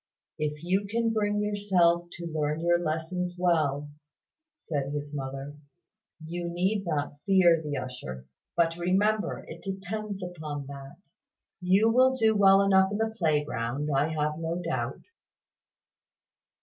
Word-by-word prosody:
"If 150 0 -3
you 190 +3 0
can 230 +1 +1
bring 210 -1 +1
yourself 185 -5 +2
to 175 - -7
learn 155 -1 -1
your 175 0 +3
lessons 175 +2 -2
well," 155 -5 +1 0.7
said 145 - -3
his 145 0 -5
mother, 135 +1 -5 0.7
"you 170 +1 -4
need 190 +3 0
not 145 -2 -2
fear 175 -4 +5
the 150 -2 -3
usher. 65 - -6 0.3
But 165 -1 +3
remember 205 +5 +1
it - - -9
depends 195 +1 -5
upon 155 -5 -5
that. 140 0 -9 0.6
You 190 +4 +3
will 260 +2 +5
do 220 -3 +3
well 195 -1 +6
enough 190 -1 +4
in 205 - -1
the 220 0 -1
playground, 150 - -1
I 140 +3 +3
have 155 -1 -1
no 165 +1 -2
doubt." 135 -8 -3
170 Hz, 135 wpm, -28 LUFS, 150-195 Hz, 0.7 s, well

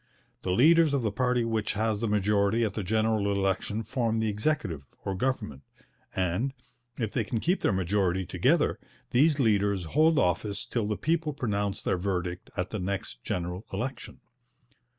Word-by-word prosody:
The - - -4
leaders 155 - +5
of 135 - 0
the 110 - 0
party 125 +1 +1
which 110 -2 -1
has 110 0 0
the 115 - 0
majority 105 +1 +2
at 105 -3 0
the 105 - -3
general 110 0 +1
election 100 +2 -1
form 115 0 -1
the 110 -1 +1
Executive, 105 - -1 0.2
or 95 - -1
Government, 95 - -2 0.5
and, 95 +9 0 0.4
if 110 -4 -2
they 120 - +1
can 115 +2 -2
keep 180 - +1
their - - +2
majority 95 0 +1
together, - - +2 0.3
these 145 +4 +4
leaders 100 -5 +2
hold 155 - +3
office 100 +2 0
till 115 -4 -1
the 105 - -1
people 160 -1 0
pronounce 105 -7 -2
their - - +1
verdict 90 -2 -3
at 90 -1 -2
the 110 - -3
next 90 -10 -4
general 90 +2 -3
election. 120 +6 -5
105 Hz, 165 wpm, -28 LUFS, 95-120 Hz, 0.5 s, leaders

